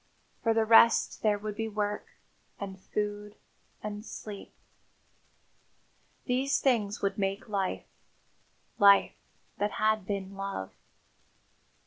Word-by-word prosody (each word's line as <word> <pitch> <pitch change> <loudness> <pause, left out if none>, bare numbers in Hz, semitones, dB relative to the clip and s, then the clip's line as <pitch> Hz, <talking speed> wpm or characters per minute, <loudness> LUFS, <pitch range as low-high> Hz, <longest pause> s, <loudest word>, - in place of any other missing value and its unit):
For 225 -2 +2
the 225 -1 +3
rest 230 +1 +5
there 210 -1 +2
would 210 0 -5
be 225 +1 -2
work, 210 -1 -2 0.5
and 190 -1 -6
food, 210 +1 -4 0.5
and 210 0 -5
sleep. 210 -3 -8 1.7
These 265 +2 +1
things 220 -6 +1
would 200 +1 0
make 195 +1 -2
life 195 -3 -2 0.9
life 200 -1 +6 0.5
that 205 0 0
had 215 -3 +1
been 195 -1 -3
love. 195 - -4
210 Hz, 105 wpm, -29 LUFS, 200-215 Hz, 1.7 s, life